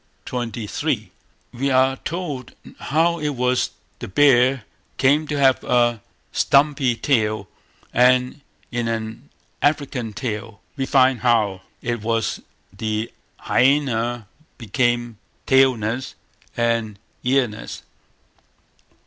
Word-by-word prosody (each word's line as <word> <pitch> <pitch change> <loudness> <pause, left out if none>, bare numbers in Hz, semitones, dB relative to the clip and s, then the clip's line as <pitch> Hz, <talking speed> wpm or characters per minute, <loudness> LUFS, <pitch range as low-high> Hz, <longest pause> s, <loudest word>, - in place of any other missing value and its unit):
xxiii, 115 -3 -3 0.4
we 135 +3 -1
are 130 0 +3
told 150 -8 -5 0.3
how 170 +3 +1
it 150 - -1
was 125 0 +1 0.3
the - - -6
bear 130 +2 +4 0.3
came 145 +4 +3
to 150 - -2
have 135 -2 +3
a 120 -2 +2 0.3
stumpy 140 -3 +3
tail, 110 -6 0 0.5
and 125 +3 +3 0.3
in 120 -1 -1
an 115 +3 -4 0.3
African 140 -6 0
tale, 110 -2 -5 0.2
we 135 -2 -2
find 130 -2 +4
how 110 -6 +2 0.2
it 120 -2 -2
was 115 0 -1 0.3
the 110 +2 -2 0.3
hyaena 120 -4 +1 0.3
became 120 -1 -1 0.3
tailless 130 -2 +2 0.4
and 115 -3 0 0.3
earless. 125 -4 -1
125 Hz, 100 wpm, -22 LUFS, 115-135 Hz, 0.5 s, bear